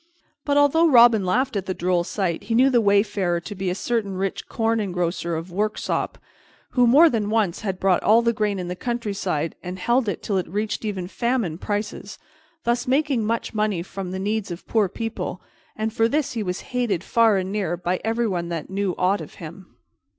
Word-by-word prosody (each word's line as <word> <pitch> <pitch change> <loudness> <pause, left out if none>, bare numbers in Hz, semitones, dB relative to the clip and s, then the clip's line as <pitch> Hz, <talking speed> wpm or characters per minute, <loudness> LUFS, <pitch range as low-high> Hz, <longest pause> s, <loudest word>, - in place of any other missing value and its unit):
But 285 -1 +2
although 290 +4 +5
Robin 235 -5 +7
laughed 255 +6 +1
at 195 -2 -2
the 185 - -2
droll 175 0 +1
sight, 175 -2 -2
he 225 +2 -1
knew 260 +3 +5
the 240 -2 +4
wayfarer 200 -4 +2
to 205 - -7
be 190 -1 -3
a 180 - -1
certain 210 -3 -2
rich 195 0 -3
corn 225 0 0
engrosser 175 -3 -2
of 165 +3 -7
Worksop, 210 +4 -2 0.5
who 245 -1 +4
more 290 +8 +7
than 220 -8 0
once 215 -6 0
had 190 -3 -3
bought 190 -2 +2
all 225 +2 +4
the 235 0 +2
grain 210 -2 0
in 180 -1 -4
the 180 - -4
countryside 200 -8 -2
and 180 0 -6
held 235 +4 +1
it 190 - -4
till 200 - 0
it 180 - -4
reached 210 +4 -2
even 190 -4 -3
famine 230 -6 -1
prices, 205 0 -4 0.5
thus 240 +1 0
making 270 -3 +1
much 230 +1 -2
money 210 -5 0
from 190 0 -6
the 185 - -4
needs 205 +2 -2
of 175 0 -7
poor 215 -4 +2
people, 220 -4 -4 0.4
and 220 0 -2
for 225 -1 +3
this 295 +3 0
he 230 - -2
was 180 -2 -3
hated 225 -8 0
far 225 -2 +3
and 190 0 -2
near 190 -5 -1
by 180 +1 -2
everyone 220 -7 -1
that 170 +1 -5
knew 195 -2 -1
aught 190 +3 +1
of - - -10
him. 175 +2 -11
205 Hz, 200 wpm, -23 LUFS, 185-230 Hz, 0.5 s, Robin